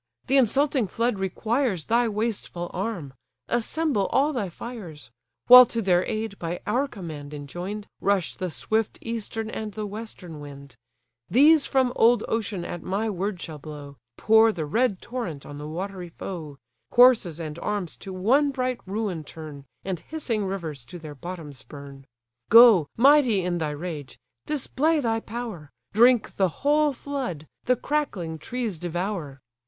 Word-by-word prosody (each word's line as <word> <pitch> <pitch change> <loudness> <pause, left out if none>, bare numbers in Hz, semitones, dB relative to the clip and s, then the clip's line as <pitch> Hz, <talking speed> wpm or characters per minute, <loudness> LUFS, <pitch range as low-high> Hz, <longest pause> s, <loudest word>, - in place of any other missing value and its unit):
the 270 - +1
insulting 270 -1 +2
flood 230 +1 -1
requires 215 - -1
Thy 235 +1 +2
wasteful 210 -5 -3
arm! 180 -8 -4 0.3
assemble 240 -2 0
all 290 +3 +2
thy 210 -8 -2
fires! 170 - -9 0.3
While 250 0 +11
to 230 - -3
their 185 -4 +3
aid, 215 -2 -3
by 170 +1 -3
our 270 +4 +1
command 155 - -8
enjoin'd, 175 +9 -6
Rush 195 -4 0
the 185 -2 -3
swift 170 - -1
eastern 225 -1 -4
and 215 -1 -5
the 215 0 -4
western 205 -6 -8
wind: 140 -1 -11 0.5
These 295 +4 +5
from 260 -2 +2
old 235 +2 +4
ocean 210 -5 -2
at 175 - -5
my 210 +4 -1
word 195 0 -3
shall 160 -3 -7
blow, 145 -2 -9 0.2
Pour 220 +1 +5
the 165 -7 -4
red 215 +4 0
torrent 210 - -5
on 145 0 -9
the 150 - -6
watery 180 +2 -5
foe, 160 -4 -7 0.3
Corses 235 -10 +5
and 160 0 -6
arms 205 -4 -3
to 195 - -9
one 245 +11 +3
bright 255 -2 -2
ruin 195 -5 -3
turn, 150 -3 -10 0.2
And 190 -3 -2
hissing 235 - -3
rivers 165 -9 -5
to 175 - -9
their 155 -3 -9
bottoms 150 -3 -8
burn. 140 -1 -11 0.4
Go, 225 -9 +8
mighty 255 -6 +5
in 175 -1 -1
thy 155 -2 -1
rage! 150 -4 -6 0.3
display 305 +2 +1
thy 225 -4 0
power, 220 -10 -7 0.2
Drink 240 +1 +4
the 190 -2 +3
whole 295 - +2
flood, 260 - -5 0.2
the 250 - +3
crackling 195 - -2
trees 225 0 -4
devour. 175 -4 -4
200 Hz, 150 wpm, -25 LUFS, 165-235 Hz, 0.5 s, While